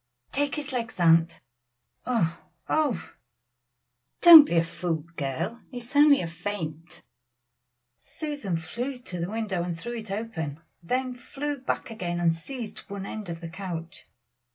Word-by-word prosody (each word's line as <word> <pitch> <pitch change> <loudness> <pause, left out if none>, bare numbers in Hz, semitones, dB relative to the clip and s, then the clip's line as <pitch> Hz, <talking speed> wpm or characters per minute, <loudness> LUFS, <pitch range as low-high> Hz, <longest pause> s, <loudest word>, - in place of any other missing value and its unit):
"Take 285 0 0
his 290 -3 -5
legs, 230 -6 -3
aunt; 165 -1 +4 0.7
oh! 180 -10 +1 0.3
oh! 305 -5 +2
oh!" - - -13 1.1
"Don't 330 -4 +12
be 170 - 0
a 165 - +5
fool, 165 -2 -3
girl, 140 - -3
it 245 -2 -7
is 245 +4 -11
only 290 -1 +7
a 170 - -3
faint." 165 -2 -6 1.0
Susan 290 - -4
flew 245 +11 -4
to 185 -8 -8
the 170 +2 -2
window 210 -4 -2
and 170 -1 -3
threw 240 +7 -5
it 220 -2 -8
open, 185 -8 -4 0.2
then 255 +8 -1
flew 280 +4 -5
back 250 -2 -3
and 175 -2 +1
seized 230 +6 -7
one 200 -1 -5
end 210 -2 -6
of 165 0 -5
the 170 - -5
couch. 170 -1 -7
200 Hz, 150 wpm, -27 LUFS, 165-250 Hz, 1.1 s, Don't